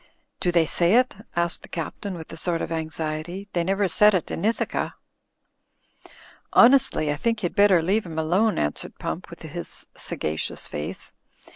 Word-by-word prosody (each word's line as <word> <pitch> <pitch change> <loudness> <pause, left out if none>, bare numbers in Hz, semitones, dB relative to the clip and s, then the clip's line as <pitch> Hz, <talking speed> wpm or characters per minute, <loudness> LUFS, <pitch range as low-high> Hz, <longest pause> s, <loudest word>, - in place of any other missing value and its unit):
"Do 175 - +1
they 170 -2 +4
say 175 +5 +2
it?" 255 +1 +4 0.2
asked 170 0 0
the - - -12
Captain, 185 +4 -5
with 165 -1 -9
a - - -5
sort 165 +1 0
of - - -5
anxiety. 160 +3 -4
"They 175 - +1
never 195 +2 +1
said 210 +4 +5
it 180 - -1
in - - -3
Ithaca." 225 +2 0 1.6
"Honestly, 235 - +5
I - - 0
think 230 +5 -1
you'd 175 - -1
better 200 -5 +5
leave 195 +3 +1
him 160 -1 -7
alone," 185 +8 +2
answered 75 0 -2
Pump, - - -4
with - - -11
his - - -6
sagacious 75 0 -4
face. 75 +1 -6
175 Hz, 165 wpm, -25 LUFS, 160-205 Hz, 1.6 s, said